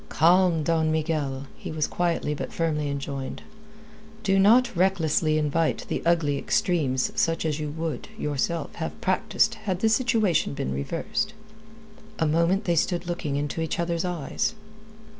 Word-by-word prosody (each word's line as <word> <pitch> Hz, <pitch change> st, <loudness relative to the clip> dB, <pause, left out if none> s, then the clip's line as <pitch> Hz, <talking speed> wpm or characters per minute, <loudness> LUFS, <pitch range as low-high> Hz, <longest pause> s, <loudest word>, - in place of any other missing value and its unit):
"Calm, 170 Hz, 0 st, +4 dB
Don 160 Hz, 0 st, +1 dB
Miguel!" 150 Hz, -4 st, -1 dB
he -, -, -7 dB
was 155 Hz, -1 st, 0 dB
quietly 170 Hz, -4 st, -1 dB
but 145 Hz, -, -5 dB
firmly 150 Hz, -3 st, -1 dB
enjoined. 140 Hz, -1 st, -4 dB, 0.8 s
"Do 195 Hz, -1 st, +3 dB
not 235 Hz, +4 st, +5 dB
recklessly 165 Hz, -4 st, +2 dB
invite 155 Hz, +1 st, 0 dB
the -, -, -1 dB
ugly 155 Hz, -5 st, +2 dB
extremes 140 Hz, -8 st, +1 dB
such 165 Hz, 0 st, 0 dB
as 155 Hz, -1 st, -1 dB
you 150 Hz, -1 st, -3 dB
would, 160 Hz, +1 st, -4 dB
yourself, 150 Hz, -, -2 dB
have -, -, -5 dB
practised -, -, +1 dB, 0.2 s
had 185 Hz, 0 st, -1 dB
the 225 Hz, -, +4 dB
situation 220 Hz, -, +2 dB
been 65 Hz, -, -2 dB
reversed." 170 Hz, -, -2 dB, 0.8 s
A 160 Hz, -, +1 dB
moment 170 Hz, +6 st, +2 dB
they 175 Hz, -4 st, +1 dB
stood 175 Hz, +2 st, 0 dB
looking 170 Hz, -5 st, -3 dB
into 145 Hz, +3 st, -2 dB
each 160 Hz, +2 st, -2 dB
other's 170 Hz, -1 st, 0 dB
eyes. 180 Hz, +4 st, -2 dB
165 Hz, 145 wpm, -26 LUFS, 150-180 Hz, 0.8 s, not